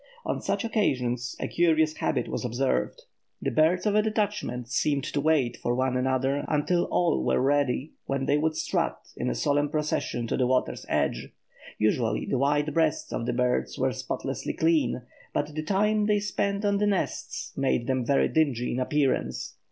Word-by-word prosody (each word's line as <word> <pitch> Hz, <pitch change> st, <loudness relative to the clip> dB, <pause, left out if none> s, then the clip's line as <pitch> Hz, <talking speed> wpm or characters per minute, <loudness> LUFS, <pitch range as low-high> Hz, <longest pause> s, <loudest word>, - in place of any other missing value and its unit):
On -, -, -2 dB
such -, -, -1 dB
occasions 125 Hz, -, 0 dB
a -, -, -2 dB
curious 160 Hz, -2 st, +2 dB
habit -, -, 0 dB
was -, -, -3 dB
observed. 120 Hz, -, -1 dB, 0.4 s
The -, -, -2 dB
birds 160 Hz, +5 st, +3 dB
of 210 Hz, -, +2 dB
a 215 Hz, -, +5 dB
detachment 210 Hz, -, -2 dB
seemed 140 Hz, +2 st, 0 dB
to 145 Hz, -, -2 dB
wait 150 Hz, -5 st, +2 dB
for 120 Hz, -, -1 dB
one 130 Hz, 0 st, 0 dB
another 130 Hz, +2 st, +1 dB
until 165 Hz, +4 st, +1 dB
all 175 Hz, -1 st, +1 dB
were -, -, +2 dB
ready, 140 Hz, +1 st, +1 dB, 0.2 s
when 135 Hz, -1 st, -1 dB
they 145 Hz, +1 st, +2 dB
would 155 Hz, +1 st, 0 dB
strut, -, -, -1 dB, 0.2 s
in 65 Hz, -, -2 dB
a 60 Hz, -, -1 dB
solemn 145 Hz, 0 st, +1 dB
procession, 150 Hz, -6 st, -1 dB
to -, -, -1 dB
the 125 Hz, -, +2 dB
water's 130 Hz, 0 st, 0 dB
edge. -, -, 0 dB, 0.5 s
Usually 110 Hz, 0 st, +1 dB
the 130 Hz, -, -1 dB
white 145 Hz, +2 st, +1 dB
breasts 160 Hz, -2 st, +1 dB
of 115 Hz, -, -2 dB
the 125 Hz, -, 0 dB
birds 120 Hz, -, 0 dB
were -, -, +1 dB
spotlessly -, -, -4 dB
clean, 155 Hz, -7 st, +1 dB, 0.3 s
but 145 Hz, +1 st, -1 dB
the 155 Hz, -, -2 dB
time 210 Hz, +5 st, +1 dB
they 210 Hz, -1 st, +3 dB
spent 200 Hz, 0 st, -1 dB
on 200 Hz, -1 st, +2 dB
the 210 Hz, -, +2 dB
nests 200 Hz, -2 st, -2 dB
made 135 Hz, -3 st, +1 dB
them 130 Hz, -1 st, 0 dB
very 140 Hz, +3 st, +3 dB
dingy 135 Hz, -6 st, +1 dB
in 125 Hz, -, -1 dB
appearance. 140 Hz, +1 st, 0 dB
145 Hz, 180 wpm, -27 LUFS, 125-165 Hz, 0.5 s, a